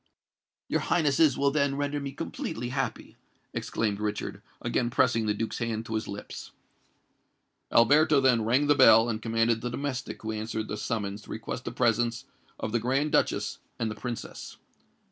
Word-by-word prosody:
"Your - - +1
Highnesses 150 -3 +3
will 140 0 +2
then 140 -1 +1
render 145 0 -1
me 140 -1 -5
completely 140 -3 -5
happy," 135 +1 -3 0.4
exclaimed 105 -3 -2
Richard, 105 0 -3 0.2
again 120 - 0
pressing 120 -2 +2
the 105 - +2
Duke's 110 +2 -3
hand 115 -1 -2
to 110 - -6
his 110 0 -2
lips. 100 +1 -7 1.2
Alberto 145 +5 +5
then 125 -4 +3
rang 125 +6 +3
the 145 - +5
bell, 115 -5 +7
and 110 -1 -2
commanded 115 0 +1
the 125 - -2
domestic 130 0 -4
who 110 - -2
answered 110 0 -4
the 105 - -3
summons 105 -2 -3
to - - -17
request - - -5
the - - -3
presence 115 0 +1 0.3
of 110 - -3
the 120 - +1
Grand 135 +6 0
Duchess - - +1 0.2
and 110 -1 -1
the - - -6
Princess. 120 +2 -6
120 Hz, 165 wpm, -28 LUFS, 110-140 Hz, 1.2 s, bell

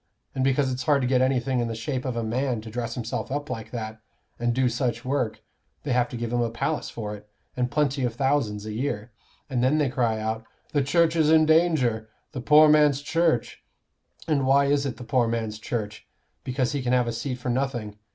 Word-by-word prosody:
And 130 - -1
because 135 0 +2
it's 130 0 -3
hard 140 -3 +3
to - - +1
get 130 0 +3
anything 130 0 +1
in 120 - 0
the 115 - -4
shape 125 +3 -3
of 130 -2 -2
a 115 - -1
man 120 +2 -1
to 110 0 -9
dress 115 0 -3
himself 120 +1 -4
up 145 0 -3
like 115 -3 -5
that, 110 -2 -6 0.4
and 120 0 +1
do 130 +1 +2
such 120 -1 -2
work, 120 -5 -1 0.4
they 145 - -3
have 125 -1 +2
to 120 - -6
give 115 0 -3
him 120 - +2
a 120 - 0
palace 135 +7 -2
for 105 -2 -5
it, 105 0 -15 0.3
and 125 0 0
plenty 140 -1 0
of 120 -2 -1
thousands 130 -6 0
a 110 - -5
year. 115 -2 -3 0.4
And 125 -3 -1
then 135 +4 +3
they 150 -3 +2
cry 120 -3 0
out 110 +1 -3 0.3
'The 145 - +3
Church 165 +3 +3
is 155 -2 +3
in 160 0 +6
danger,' 155 -9 +2 0.2
'the 130 - -5
poor 150 +4 +7
man's 150 -2 +4
Church.' 150 -7 0 0.6
And 140 -4 +1
why 140 +1 +5
is 140 0 +1
it 125 - -5
the 125 - -8
poor 125 -1 +1
man's 110 -2 -2
Church? 105 -2 -5 0.4
Because 130 -1 -1
he 145 -1 -2
can 125 0 0
have 125 -1 +3
a 115 - -2
seat 125 +3 -3
for 125 0 -5
nothing. 120 -5 -2
125 Hz, 225 wpm, -25 LUFS, 115-140 Hz, 0.6 s, poor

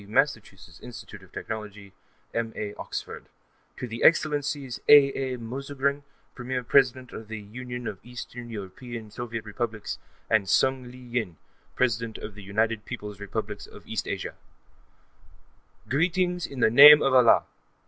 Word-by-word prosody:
(Massachusetts 110 -3 -1
Institute 105 -4 -10
of 95 - -18
Technology); 105 -3 -7 0.4
M.A. 110 -3 -3
(Oxford): - - -6 0.5
to 125 - -5
their 115 0 -6
Excellencies 145 -5 +2
A.A. 135 -3 +6
Mouzorgin, 140 +4 -2 0.3
Premier 125 0 -4
President 130 0 +3
of 110 - -8
the 110 0 -6
Union 125 +4 -7
of 95 - -5
East 125 +2 -9
European 115 0 -8
Soviet 115 -2 -5
Republics, 110 0 -4 0.3
and 105 -4 +2
Sung 130 +5 +2
Li 125 - -12
Yin, 120 -9 -4 0.4
President 115 -2 0
of 105 - -8
the 105 - -11
United 110 +2 -1
Peoples' 105 -2 -7
Republics 105 0 -5
of - - -14
East - - -3
Asia, - - -4 1.5
Greetings, 180 +4 +1
in 135 -3 -7
the 110 - +5
name 145 +4 +10
of 135 - +2
Allah! 125 -3 +6
120 Hz, 135 wpm, -26 LUFS, 105-130 Hz, 1.5 s, name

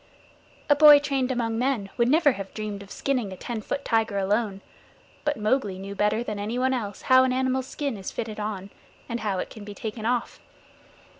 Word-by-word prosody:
A 290 - +5
boy 295 0 +9
trained 275 -3 0
among 230 -2 -1
men 245 -7 0
would 235 - +2
never 305 0 +5
have 195 -5 -7
dreamed 210 -2 -4
of 200 - -12
skinning 250 -6 -1
a 185 - -8
ten 235 +1 -5
foot 280 +6 -4
tiger 225 -3 +1
alone, 200 0 0 0.6
but 295 -1 0
Mowgli 210 -3 0
knew 195 +1 -6
better 210 +3 +1
than 210 -3 -4
anyone 245 +5 0
else 205 -6 -4
how 260 0 +6
an 260 - +2
animal's 260 0 0
skin 280 -3 -3
is 190 - -5
fitted 220 -2 -5
on, 200 -2 -4 0.4
and 235 0 -3
how 205 -4 -1
it - - -4
can 215 - -10
be 205 0 -9
taken 220 +1 -4
off. 245 -1 -1
225 Hz, 200 wpm, -26 LUFS, 205-260 Hz, 0.6 s, boy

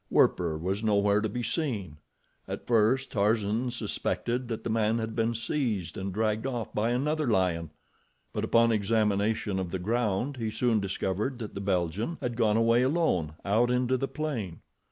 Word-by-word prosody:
Werper 85 -3 +3
was 95 +6 -2
nowhere 105 -1 +3
to 110 - -1
be 120 +4 -3
seen. 110 - -2 0.5
At - - -5
first 120 +3 +2
Tarzan 110 +3 +1
suspected 120 +1 -2
that 115 -2 -4
the - - -3
man 110 0 +2
had 110 -1 -3
been 115 0 +1
seized 115 - -2
and 95 0 -4
dragged 110 +4 0
off 120 -4 -4
by 110 +2 +1
another 150 +5 0
lion, 90 -7 +1 0.6
but - - -2
upon 115 0 +4
examination 105 -1 +1
of 95 -2 -3
the 95 - -2
ground 115 +6 -1
he 115 -2 -2
soon 115 0 +1
discovered 100 +5 -2
that 110 -3 -6
the 100 - -5
Belgian 95 - -1
had 120 -1 -3
gone 110 -2 +2
away 115 +1 +4
alone 130 - +1
out 110 +5 +3
into 125 +1 +2
the 135 +2 -1
plain. 120 - -4
110 Hz, 170 wpm, -28 LUFS, 100-120 Hz, 0.6 s, upon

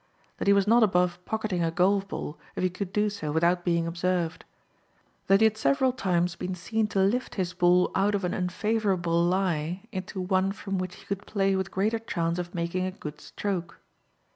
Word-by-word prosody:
That - - -2
he 200 - +7
was 200 -1 +3
not 230 +3 +5
above 180 -3 +2
pocketing 215 -5 -2
a 165 - +2
golf 195 +4 +2
ball 155 -4 -6 0.2
if - - -2
he 185 - +2
could 185 +1 -5
do 210 +1 +2
so 200 -8 -4
without 170 +3 +2
being 170 -1 +1
observed. 175 -1 -1 0.8
That 195 +2 +5
he - - +6
had 220 0 +2
several 265 +1 +3
times 180 -7 0
been 180 +1 -4
seen 220 +5 -1
to 200 - -1
lift 225 +7 0
his 185 -2 -2
ball 180 0 +3
out 200 +2 +2
of 200 - -2
an 180 - -1
unfavorable 180 -3 0
lie 175 -1 0
into 190 +1 -5
one 190 +1 +1
from 195 -2 -4
which 185 0 -4
he - - -16
could 200 +1 -4
play 195 -2 +1
with 190 0 -1
greater 210 +4 0
chance 170 -6 -2
of 175 +1 -5
making 175 +2 -1
a - - -3
good 150 -4 -8
stroke. 180 -4 -4
185 Hz, 200 wpm, -27 LUFS, 175-200 Hz, 0.8 s, he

